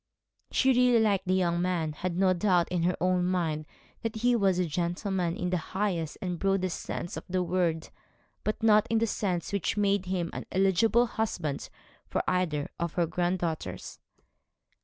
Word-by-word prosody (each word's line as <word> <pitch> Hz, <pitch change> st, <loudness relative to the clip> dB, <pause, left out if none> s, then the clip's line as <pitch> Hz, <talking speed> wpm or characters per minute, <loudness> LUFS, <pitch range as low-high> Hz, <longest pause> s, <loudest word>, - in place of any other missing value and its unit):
She 265 Hz, -, +3 dB
really 250 Hz, -1 st, +4 dB
liked 200 Hz, -4 st, +1 dB
the 185 Hz, -, +3 dB
young 175 Hz, -2 st, +1 dB
man, 175 Hz, -4 st, 0 dB
had 175 Hz, +2 st, -3 dB
no 185 Hz, -1 st, +4 dB
doubt 180 Hz, -2 st, +2 dB
in 180 Hz, -1 st, 0 dB
her 180 Hz, +2 st, +1 dB
own 180 Hz, 0 st, +2 dB
mind 165 Hz, -4 st, -1 dB, 0.3 s
that 225 Hz, 0 st, -3 dB
he 240 Hz, +2 st, +2 dB
was 195 Hz, -5 st, +2 dB
a 180 Hz, -, +2 dB
gentleman 175 Hz, +2 st, -1 dB
in 180 Hz, 0 st, -2 dB
the 180 Hz, -, +2 dB, 0.2 s
highest 180 Hz, -6 st, -1 dB
and 180 Hz, -2 st, -3 dB
broadest 195 Hz, -2 st, 0 dB
sense 170 Hz, -, -5 dB
of -, -, -6 dB
the 185 Hz, 0 st, +1 dB
word, 170 Hz, -2 st, 0 dB, 0.5 s
but 215 Hz, +1 st, -2 dB
not 215 Hz, 0 st, +5 dB
in 225 Hz, -, +2 dB
the 225 Hz, -, +3 dB
sense 190 Hz, -4 st, -2 dB
which 200 Hz, +1 st, -1 dB
made 200 Hz, -2 st, +1 dB
him 180 Hz, -2 st, -1 dB
an -, -, -6 dB
eligible 195 Hz, +5 st, +3 dB
husband 180 Hz, -, -3 dB, 0.4 s
for -, -, -1 dB
either 160 Hz, -6 st, 0 dB
of 170 Hz, -1 st, -2 dB
her 175 Hz, -, +2 dB
granddaughters. 170 Hz, -, -3 dB
180 Hz, 175 wpm, -29 LUFS, 170-200 Hz, 0.5 s, not